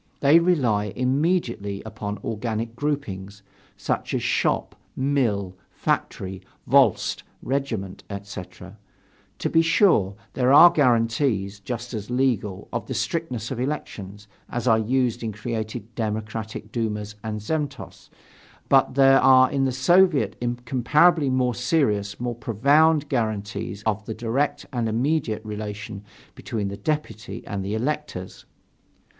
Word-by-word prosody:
They 145 Hz, +4 st, +6 dB
rely 130 Hz, -13 st, +2 dB
immediately 125 Hz, -, 0 dB
upon 105 Hz, -2 st, -5 dB
organic 115 Hz, +1 st, -3 dB
groupings, 105 Hz, -9 st, -4 dB, 0.3 s
such -, -, -2 dB
as -, -, -1 dB
shop, -, -, 0 dB, 0.2 s
mill, 115 Hz, -9 st, 0 dB
factory, 95 Hz, 0 st, -2 dB, 0.2 s
volost, -, -, +3 dB, 0.2 s
regiment, 120 Hz, -9 st, -3 dB
etc. 100 Hz, -2 st, -9 dB, 0.6 s
To -, -, -2 dB
be 165 Hz, -, +5 dB
sure, 165 Hz, -, +3 dB, 0.2 s
there 125 Hz, 0 st, +2 dB
are 170 Hz, +5 st, +9 dB
guarantees, 115 Hz, -6 st, +1 dB
just 120 Hz, +4 st, -6 dB
as 105 Hz, -1 st, -5 dB
legal, 120 Hz, -7 st, 0 dB
of 120 Hz, -, -3 dB
the 130 Hz, -, -4 dB
strictness 125 Hz, -, -2 dB
of 130 Hz, -, -3 dB
elections, 105 Hz, -7 st, -5 dB, 0.2 s
as 120 Hz, +1 st, -3 dB
are 110 Hz, -2 st, +5 dB
used 125 Hz, +1 st, 0 dB
in 110 Hz, -2 st, -3 dB
creating 110 Hz, -1 st, -4 dB
democratic 110 Hz, -1 st, -4 dB
dumas 105 Hz, -3 st, -3 dB
and 110 Hz, -1 st, -3 dB
zemstvos. 150 Hz, +7 st, -4 dB, 0.6 s
But 135 Hz, -1 st, +4 dB
there 135 Hz, -1 st, +6 dB
are 130 Hz, -1 st, +6 dB
in 135 Hz, -1 st, +1 dB
the 130 Hz, -, +1 dB
Soviet 140 Hz, -, +3 dB
incomparably 130 Hz, +6 st, +2 dB
more 130 Hz, -1 st, +1 dB
serious, 110 Hz, -6 st, 0 dB
more 120 Hz, 0 st, -2 dB
profound 140 Hz, +7 st, +3 dB
guarantees 105 Hz, -4 st, -3 dB
of 110 Hz, -1 st, -1 dB
the 110 Hz, -, -4 dB
direct 120 Hz, +6 st, -1 dB
and 120 Hz, -3 st, 0 dB
immediate 115 Hz, -2 st, 0 dB
relation 105 Hz, -1 st, -6 dB, 0.3 s
between 105 Hz, -3 st, -4 dB
the 100 Hz, -, -5 dB
deputy 150 Hz, -3 st, -4 dB
and 100 Hz, -2 st, -4 dB
the 100 Hz, +3 st, -2 dB
electors. 125 Hz, -6 st, -4 dB
115 Hz, 125 wpm, -24 LUFS, 105-135 Hz, 0.6 s, are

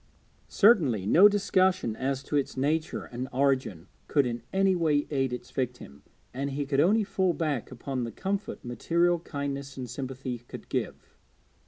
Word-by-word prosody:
Certainly 150 Hz, -, +4 dB
no 185 Hz, -, +7 dB
discussion 185 Hz, -, +1 dB
as 135 Hz, +2 st, -2 dB
to -, -, -4 dB
its 140 Hz, -2 st, -1 dB
nature 155 Hz, +4 st, 0 dB
and 125 Hz, +2 st, -6 dB
origin 130 Hz, -10 st, 0 dB, 0.2 s
could 145 Hz, -3 st, +3 dB
in 120 Hz, -1 st, -3 dB
any 190 Hz, 0 st, +3 dB
way 155 Hz, -4 st, +2 dB
aid 135 Hz, -3 st, 0 dB
its 125 Hz, 0 st, -6 dB
victim, 125 Hz, -, -4 dB, 0.3 s
and 140 Hz, +2 st, -2 dB
he 140 Hz, +1 st, -3 dB
could 135 Hz, 0 st, 0 dB
only 205 Hz, +8 st, +4 dB
fall 190 Hz, -3 st, 0 dB
back 150 Hz, -8 st, -2 dB
upon 130 Hz, -3 st, -4 dB
the 115 Hz, -, -4 dB
comfort 195 Hz, -, -4 dB
material 170 Hz, +8 st, +1 dB
kindness 140 Hz, -3 st, -5 dB
and 130 Hz, -1 st, -5 dB
sympathy 130 Hz, 0 st, -5 dB
could 120 Hz, -, -11 dB
give. -, -, -4 dB
140 Hz, 160 wpm, -28 LUFS, 125-170 Hz, 0.3 s, no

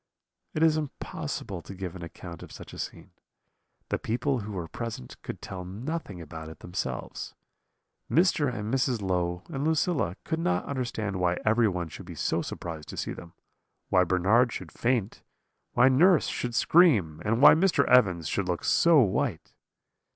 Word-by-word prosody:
"It 155 Hz, -, +2 dB
is 160 Hz, -1 st, +4 dB
impossible 130 Hz, -, -5 dB
to 95 Hz, -, -10 dB
give 95 Hz, -2 st, -6 dB
an 90 Hz, -, -8 dB
account 85 Hz, 0 st, -9 dB
of -, -, -11 dB
such -, -, -11 dB
a -, -, -9 dB
scene; -, -, -7 dB, 0.8 s
the -, -, -1 dB
people 125 Hz, +4 st, -1 dB
who 105 Hz, -1 st, -6 dB
were 90 Hz, -4 st, -4 dB
present 115 Hz, -, -7 dB
could -, -, -7 dB
tell 95 Hz, -2 st, -6 dB
nothing 105 Hz, -, -5 dB
about 80 Hz, -1 st, -8 dB
it 80 Hz, -, -12 dB
themselves. 65 Hz, -9 st, -5 dB, 0.7 s
Mr. 165 Hz, -5 st, +3 dB
and 110 Hz, 0 st, -4 dB
Mrs. 130 Hz, -3 st, +1 dB
Low 90 Hz, -1 st, -1 dB
and 135 Hz, 0 st, -3 dB
Lucilla 155 Hz, -, +1 dB
could 160 Hz, -1 st, -2 dB
not 90 Hz, -, 0 dB
understand 115 Hz, -7 st, -3 dB
why 90 Hz, -1 st, +1 dB
everyone 110 Hz, -6 st, +2 dB
should -, -, -10 dB
be -, -, -8 dB
so -, -, 0 dB
surprised 80 Hz, -3 st, -6 dB
to -, -, -7 dB
see -, -, -3 dB
them; 85 Hz, 0 st, -11 dB, 0.6 s
why 90 Hz, -, +5 dB
Bernard 100 Hz, +7 st, +3 dB
should -, -, -7 dB
faint, 115 Hz, -4 st, -1 dB, 0.5 s
why 125 Hz, +2 st, +5 dB
nurse 160 Hz, +6 st, +5 dB
should 120 Hz, -1 st, -3 dB
scream, 110 Hz, -, +4 dB
and 115 Hz, +2 st, +1 dB
why 145 Hz, -, +9 dB
Mr. 165 Hz, -4 st, +3 dB
Evans 95 Hz, -11 st, +4 dB
should 95 Hz, +3 st, -1 dB
look 90 Hz, -1 st, -2 dB
so 170 Hz, -3 st, +5 dB
white. 110 Hz, -, -1 dB
105 Hz, 165 wpm, -28 LUFS, 90-135 Hz, 0.8 s, why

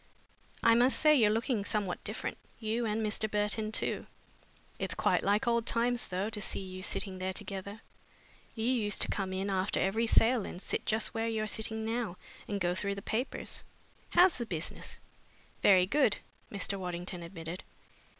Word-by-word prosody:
I 230 Hz, -, +7 dB
must 245 Hz, +3 st, +5 dB
say 305 Hz, 0 st, +6 dB
you're 225 Hz, -6 st, +5 dB
looking 225 Hz, 0 st, 0 dB
somehow 200 Hz, -3 st, 0 dB
different, -, -, -3 dB, 0.2 s
you 225 Hz, +1 st, -1 dB
and 215 Hz, +1 st, 0 dB
Mr. 215 Hz, +1 st, 0 dB
Burton 210 Hz, +1 st, 0 dB
too. -, -, -2 dB, 0.7 s
It's -, -, -2 dB
quite -, -, +2 dB
like 205 Hz, +3 st, +2 dB
old 235 Hz, -1 st, +2 dB
times, 240 Hz, +1 st, +1 dB
though, 190 Hz, +4 st, -2 dB
to 210 Hz, -1 st, -2 dB
see -, -, -1 dB
you 185 Hz, -1 st, -7 dB
sitting 190 Hz, -1 st, 0 dB
there 185 Hz, 0 st, -2 dB
together. 200 Hz, +2 st, -5 dB, 0.7 s
You 225 Hz, -1 st, -2 dB
used 230 Hz, -5 st, +1 dB
to -, -, -3 dB
come 195 Hz, -2 st, -2 dB
in 190 Hz, +1 st, -2 dB
after 190 Hz, +1 st, 0 dB
every 220 Hz, +4 st, +1 dB
sale 225 Hz, 0 st, +5 dB
and 175 Hz, -, -7 dB
sit -, -, -4 dB
just 220 Hz, 0 st, 0 dB
where 225 Hz, 0 st, -1 dB
you're 220 Hz, -1 st, -1 dB
sitting 220 Hz, 0 st, +1 dB
now 225 Hz, -5 st, -2 dB, 0.3 s
and 205 Hz, -, -2 dB
go 175 Hz, -1 st, +1 dB
through 200 Hz, +2 st, -2 dB
the 200 Hz, -, -8 dB
papers. 240 Hz, +5 st, -3 dB, 0.5 s
How's 360 Hz, -6 st, +5 dB
the 235 Hz, -, -2 dB
business?" 165 Hz, -4 st, -4 dB, 0.6 s
"Very 185 Hz, -3 st, +6 dB
good," 245 Hz, 0 st, +3 dB, 0.3 s
Mr. 200 Hz, 0 st, -1 dB
Waddington 180 Hz, 0 st, -4 dB
admitted. 170 Hz, 0 st, -7 dB
210 Hz, 170 wpm, -31 LUFS, 190-225 Hz, 0.7 s, I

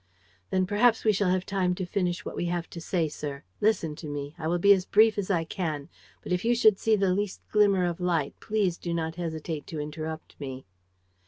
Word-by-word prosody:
"Then 185 Hz, 0 st, +2 dB
perhaps 220 Hz, +4 st, +3 dB
we 215 Hz, -, +5 dB
shall 200 Hz, -1 st, +1 dB
have 185 Hz, 0 st, +1 dB
time 185 Hz, -2 st, 0 dB
to 185 Hz, -, -3 dB
finish 180 Hz, -1 st, -1 dB
what -, -, -5 dB
we -, -, -2 dB
have 175 Hz, 0 st, -2 dB
to 170 Hz, -, -7 dB
say, 165 Hz, -1 st, 0 dB
sir. 145 Hz, -2 st, -6 dB, 0.2 s
Listen 185 Hz, -8 st, +1 dB
to 160 Hz, -, -7 dB
me. 145 Hz, 0 st, -5 dB
I 160 Hz, -, -4 dB
will 175 Hz, +2 st, +1 dB
be 200 Hz, +3 st, +7 dB
as 190 Hz, -2 st, +1 dB
brief 215 Hz, +3 st, +5 dB
as 200 Hz, -, -3 dB
I 170 Hz, -4 st, +2 dB
can. 160 Hz, -4 st, -4 dB, 0.3 s
But -, -, -7 dB
if 180 Hz, 0 st, +1 dB
you 235 Hz, +1 st, +3 dB
should 220 Hz, -4 st, +5 dB
see 220 Hz, -1 st, +3 dB
the 195 Hz, -3 st, +2 dB
least 205 Hz, 0 st, -2 dB
glimmer 200 Hz, -3 st, +4 dB
of 175 Hz, -1 st, -2 dB
light, 165 Hz, -5 st, 0 dB
please 200 Hz, -5 st, 0 dB
do 170 Hz, -1 st, -3 dB
not 160 Hz, -1 st, -2 dB
hesitate 160 Hz, -2 st, -4 dB
to 160 Hz, -, -5 dB
interrupt 155 Hz, +1 st, -6 dB
me." 135 Hz, -2 st, -6 dB
180 Hz, 225 wpm, -27 LUFS, 160-200 Hz, 0.3 s, be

